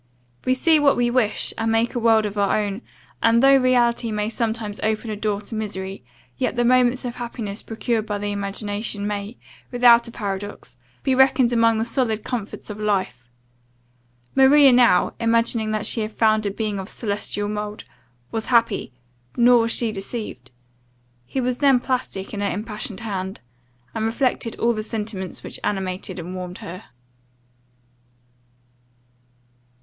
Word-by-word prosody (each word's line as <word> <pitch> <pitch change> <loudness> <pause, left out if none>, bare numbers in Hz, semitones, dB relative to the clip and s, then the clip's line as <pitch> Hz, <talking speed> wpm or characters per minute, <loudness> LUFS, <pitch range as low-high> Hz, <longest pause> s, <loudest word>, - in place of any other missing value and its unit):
We 255 - +3
see 315 +4 +4
what 285 -1 +4
we 240 0 +2
wish, 240 -4 0
and 225 0 0
make 225 +1 +1
a 245 - -1
world 225 -2 +4
of 205 0 -4
our 200 +1 +2
own 205 +1 -3 0.4
and, 230 +2 +4
though 275 0 +7
reality 245 -2 +2
may 210 0 -1
sometimes 220 -2 -3
open 220 +1 -1
a - - -3
door 210 -1 -2
to 210 - -10
misery, 195 - -5 0.4
yet - - 0
the 240 0 +1
moments 250 +1 +3
of 240 0 -5
happiness 230 -4 -5
procured 225 -1 -2
by 205 - -2
the 205 0 -3
imagination, 205 +1 -3
may, 205 +2 -4 0.3
without 240 -1 +6
a - - -8
paradox, 205 -2 -6 0.3
be 265 - +2
reckoned 260 -2 +4
among 230 -1 +3
the 220 - 0
solid 230 -3 0
comforts 225 -3 -5
of 210 - -8
life. 190 - -1 1.1
Maria 275 +1 +7
now, 240 -7 +4
imagining 230 -1 +1
that 215 0 -2
she 225 - +1
had 215 0 -3
found 215 -1 +2
a - - +1
being 205 0 -3
of 190 +2 -6
celestial 205 -1 -2
mould 210 0 -4 0.5
was 225 -1 -3
happy, 235 - +2 0.5
nor 245 0 +6
was 230 0 +1
she 230 -1 +2
deceived. 195 - -6 0.8
He 265 - -3
was 250 -1 -1
then 275 -3 +5
plastic 245 -7 -3
in 205 - -3
her 200 - 0
impassioned 210 +1 -5
hand 190 -3 -4 0.5
and 220 - -2
reflected 235 -1 -1
all 235 +1 +1
the 215 - -3
sentiments 215 -4 -4
which - - -6
animated 190 -1 -3
and 175 +1 -6
warmed 180 -1 -6
her. 185 +5 -9
220 Hz, 160 wpm, -22 LUFS, 205-240 Hz, 1.1 s, though